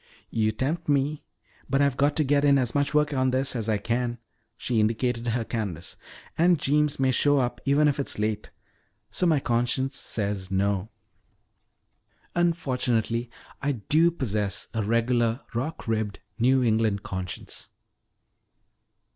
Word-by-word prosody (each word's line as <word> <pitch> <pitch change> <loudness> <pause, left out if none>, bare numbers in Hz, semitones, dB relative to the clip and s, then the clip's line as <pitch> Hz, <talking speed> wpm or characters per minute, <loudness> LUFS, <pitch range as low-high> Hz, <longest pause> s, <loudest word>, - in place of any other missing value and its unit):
"You 110 -1 +1
tempt 150 +9 -2
me, 145 +1 +1 0.5
but 135 - +2
I've 140 -2 +3
got 145 +2 +2
to 155 - +3
get 145 0 +2
in 140 -1 +5
as 125 -4 0
much 145 0 +1
work 150 0 +2
on 130 -1 +2
this 130 +1 +1
as 115 -2 -2
I 110 - +2
can," 120 +3 -1 0.4
she 120 -3 0
indicated 115 +2 0
her 115 0 0
canvas. 100 -9 -4 0.4
"And 175 +1 +5
Jeems 150 +1 +1
may 130 -1 +3
show 145 +3 +3
up 120 -2 -1
even 145 +2 +4
if 145 -1 0
it 140 - -1
is - - -3
late. 105 0 -2 0.6
So 180 - 0
my 155 -4 +4
conscience 125 +2 0
says 100 -3 -2
'No.' 100 +1 0 1.4
Unfortunately 125 -9 0 0.3
I 145 +1 0
do 155 +9 +3
possess 105 -11 -2
a 110 - 0
regular 115 +2 +1
rock 130 +4 -4
ribbed 110 -2 -1 0.2
New 130 +2 +4
England 110 -3 +1
conscience." 95 -1 -6
125 Hz, 145 wpm, -26 LUFS, 110-140 Hz, 1.4 s, in